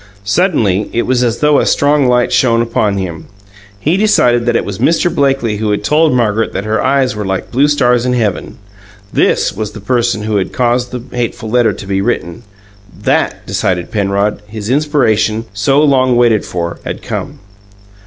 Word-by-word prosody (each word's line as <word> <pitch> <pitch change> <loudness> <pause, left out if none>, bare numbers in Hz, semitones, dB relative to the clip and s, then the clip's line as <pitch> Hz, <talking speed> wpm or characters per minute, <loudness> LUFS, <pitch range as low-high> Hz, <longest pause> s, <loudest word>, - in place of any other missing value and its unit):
Suddenly 105 - +1
it 120 - +1
was 125 -1 +1
as 120 -1 -1
though 150 -1 +4
a - - +1
strong 145 -1 +2
light 125 0 +2
shone 115 -2 +3
upon 110 -3 -1
him: 85 -4 -5 0.5
he 160 - +1
decided 125 - +2
that 120 - +2
it - - 0
was 100 -2 -6
Mr. 170 +1 +2
Blakely 135 -6 0
who 110 0 -2
had 105 0 -1
told 155 +6 +3
Margaret 115 -3 0
that 100 - -3
her 110 +1 0
eyes 135 -4 +1
were 105 - -4
like 95 -1 -3
blue 135 +4 +3
stars 125 -5 +2
in 125 0 0
heaven 110 -6 -2 0.6
THIS - - +1
was 105 +1 -5
the 110 - -8
person 120 0 0
who 105 -1 -1
had 95 - -2
caused 120 0 0
the 125 -2 -6
hateful 115 -2 -3
letter 120 -2 +3
to 100 - -9
be 95 0 -1
written! 85 -6 -2 0.6
That - - -1
decided 90 0 -2
Penrod; 100 -1 -1
his 105 +1 -5
inspiration, 115 -7 +1
so 135 +8 +2
long 130 -4 +3
waited 120 -3 +2
for, 85 -1 -4
had - - -6
come. - - -5
115 Hz, 185 wpm, -14 LUFS, 105-130 Hz, 0.6 s, though